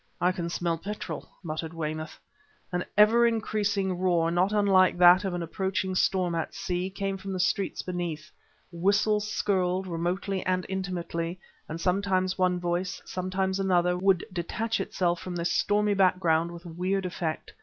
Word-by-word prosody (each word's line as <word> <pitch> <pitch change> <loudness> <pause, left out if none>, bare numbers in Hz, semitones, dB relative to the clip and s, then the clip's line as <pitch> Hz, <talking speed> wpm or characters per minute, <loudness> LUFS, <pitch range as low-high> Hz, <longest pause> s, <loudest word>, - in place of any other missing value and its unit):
"I 180 - +3
can 175 -2 -4
smell 170 -1 -1
petrol!" 205 +4 -6
muttered 160 0 -4
Weymouth. 155 0 -4 0.5
An 180 0 -1
ever 230 +3 +6
increasing 205 -4 0
roar, 170 -3 +2
not 180 +3 +2
unlike 195 -4 +4
that 180 +2 +7
of 190 -3 -2
an 175 - -3
approaching 190 +2 -2
storm 185 -1 +1
at 165 -1 -3
sea, 185 -1 -2
came 195 0 -3
from 195 0 -6
the 185 - -3
streets 195 +2 0
beneath. 170 -3 -4 0.4
Whistles 205 +4 +2
skirled, 185 -2 0
remotely 185 +3 -2
and 185 -1 0
intimately, 180 -2 -3 0.3
and 160 +1 -5
sometimes 185 0 +1
one 180 -1 +1
voice, 175 +1 -2
sometimes 190 +1 -2
another, 180 -2 +2
would 185 -1 +2
detach 220 +6 -2
itself 175 -2 0
from 180 0 -6
this 170 0 -1
stormy 210 0 +2
background 180 -4 +2
with 170 +1 -10
weird 185 +3 -2
effect. 170 -3 -4
185 Hz, 155 wpm, -27 LUFS, 175-195 Hz, 0.5 s, that